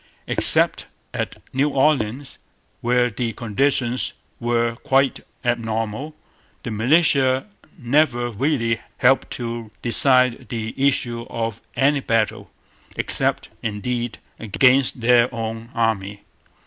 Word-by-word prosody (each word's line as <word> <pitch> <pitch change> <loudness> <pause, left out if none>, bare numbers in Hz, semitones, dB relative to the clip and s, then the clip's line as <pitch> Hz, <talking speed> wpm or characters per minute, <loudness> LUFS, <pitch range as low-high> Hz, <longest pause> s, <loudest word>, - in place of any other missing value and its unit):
Except - - +2 0.3
at - - -4
New 140 +3 +2
Orleans, 135 -2 0 0.4
where 125 0 +2
the 115 +1 -3
conditions 120 +3 0 0.3
were 120 -1 0
quite 135 -1 +1 0.3
abnormal, 115 +4 -2 0.5
the 115 - -4
militia 130 +2 +3 0.3
never 120 -2 +1
really 115 -1 0 0.2
helped 130 +2 +3
to 115 -2 -5
decide 125 +1 +3
the 110 -2 -4
issue 125 -4 0
of 115 -1 -3
any 140 +1 +3
battle, 115 -5 -1 0.5
except, - - -1
indeed, 120 +2 -3 0.2
against 125 +4 +3
their 120 +1 +4
own 115 0 -5
army. 105 -3 -1
120 Hz, 100 wpm, -22 LUFS, 115-135 Hz, 0.5 s, their